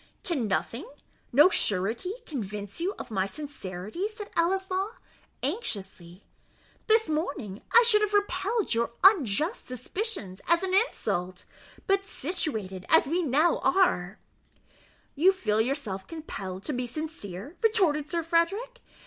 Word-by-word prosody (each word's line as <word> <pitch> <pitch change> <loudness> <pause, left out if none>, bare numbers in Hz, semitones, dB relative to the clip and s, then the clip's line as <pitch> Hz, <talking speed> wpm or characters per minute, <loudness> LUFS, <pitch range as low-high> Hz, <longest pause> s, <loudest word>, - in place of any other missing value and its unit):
"Can 280 -11 -1
nothing 235 - -2 0.4
no 295 +8 +7
surety 220 - +1
convince 210 - -5
you 385 +4 -1
of - - -8
my 190 -2 0
sincerity?" 215 - -5
said 425 -1 -9
Ellieslaw, 380 +4 0 0.5
anxiously; 200 - -3 0.6
"this 445 0 +4
morning 285 - -3
I 475 - +8
should 425 -2 +5
have 420 -1 +1
repelled 410 - +1
your 235 0 0
unjust 330 - +4
suspicions 255 - -5
as 340 +2 +3
an 375 -1 -1
insult; 200 - 0 0.4
but 390 0 +2
situated 240 - -2
as 320 - +6
we 335 +6 0
now 310 +2 +3
are 215 - +2 0.5
" - - -32
"You 380 - +8
feel 220 - 0
yourself 225 -7 -3
compelled 195 - -6
to 300 - -2
be 250 -1 -2
sincere?" 275 - -6
retorted 360 -10 +2
Sir 335 0 -1
Frederick. 395 +10 0
305 Hz, 130 wpm, -28 LUFS, -, 0.6 s, I